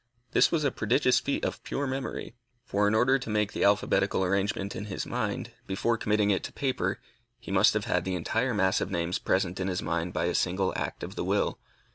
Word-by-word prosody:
This - - +4
was 160 -3 +1
a 140 - +2
prodigious 125 +4 +2
feat 140 - -2
of - - -4
pure 140 - -2
memory; 130 -2 -4 0.3
for 105 -3 +1
in 105 - +2
order 130 +4 +4
to 125 - -7
make 105 -1 0
the - - -1
alphabetical 100 -1 +2
arrangement 100 +1 0
in 100 - -5
his 100 - -4
mind, - - -3 0.2
before 105 +5 +1
committing 105 -2 +1
it 95 - 0
to - - -6
paper, 125 -9 -1 0.4
he 120 - -9
must 100 +3 +5
have 110 - 0
had 90 - +1
the 95 0 -2
entire 115 +8 0
mass 95 -2 +2
of - - -2
names 85 -1 -1
present 95 -1 0
in 95 - -1
his 90 -1 -2
mind 85 +2 -1
by - - -1
a 90 - 0
single 95 +2 +1
act - - -3
of - - -5
the - - -3
will. - - 0
100 Hz, 220 wpm, -28 LUFS, 95-115 Hz, 0.4 s, must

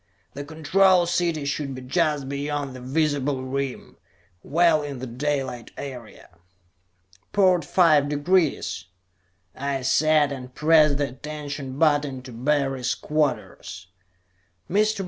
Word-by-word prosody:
The 145 - -6
Control 175 +5 +3
City 170 -3 0
should 140 -1 -3
be 130 - -8
just 150 0 0
beyond 140 -1 -3
the 130 - -9
visible 140 0 0
rim; 135 0 -4 0.4
well 165 0 +3
in 145 -2 -6
the 130 - -6
daylight 130 -1 -3
area. 120 -10 -10 0.9
"Port 185 -4 +4
five 150 -3 +4
degrees," 155 +3 0 0.7
I 140 -1 -3
said, 150 +2 +3
and 130 -2 -8
pressed 150 -2 +4
the 145 -1 -1
attention 145 0 -7
button 145 -4 +1
to 130 - -10
Barry's 135 +1 0
quarters. 145 - -3 0.8
"Mr. 215 +2 +1
145 Hz, 115 wpm, -24 LUFS, 135-155 Hz, 0.9 s, Port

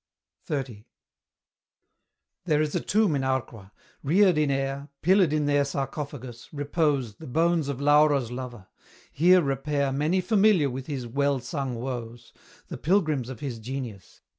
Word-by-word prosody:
XXX. 125 -7 -4 1.6
There 155 -4 +2
is 150 -1 0
a - - +1
tomb 205 -6 +1
in 140 - 0
Arqua; 130 -7 -3 0.3
reared 180 +5 +4
in 150 -1 +2
air, 135 +1 -2
Pillared 185 -2 +4
in 150 -1 +1
their 145 0 +3
sarcophagus, 135 -3 -5
repose 145 -6 -1
The 160 - -10
bones 165 +2 +1
of 135 -2 -3
Laura's 145 -4 +3
lover: 125 -5 -7 0.5
here 180 +4 +5
repair 140 0 -1
Many 150 +7 +1
familiar 190 - +3
with 130 +1 -6
his 135 -5 -4
well 140 +3 0
sung 130 +1 -4
woes, 120 -1 -6 0.4
The - - -6
pilgrims 155 - +1
of 130 -4 -8
his 130 -5 -4
genius. 120 -4 -7
140 Hz, 140 wpm, -26 LUFS, 130-155 Hz, 1.6 s, here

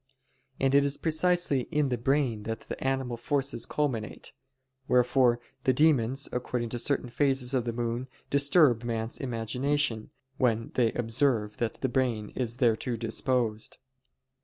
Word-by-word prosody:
And 135 0 +2
it 140 0 +6
is 140 0 -1
precisely 160 -4 +1
in 150 -4 +1
the 125 - -1
brain 130 -3 +1
that 110 - -5
animal 130 -2 -1
forces 135 +1 -1
culminate: 130 -8 -3 0.5
wherefore 125 -1 +3 0.2
the 130 - +3
demons, 135 -2 +3
according 125 -1 -2
to 120 - -4
certain 135 +1 0
phases 135 0 +1
of 125 -3 +1
the 120 - -1
moon, 120 +2 -3 0.2
disturb 140 -4 +4
man's 115 -1 -3
imagination, 125 0 -1 0.3
when 115 -3 0
they 120 -3 +2
observe 115 -3 0
that 115 -2 -2
the 130 - +1
brain 120 -5 -1
is 120 -2 -3
thereto 120 0 +1
disposed. 115 -1 -1
125 Hz, 135 wpm, -28 LUFS, 115-140 Hz, 0.5 s, it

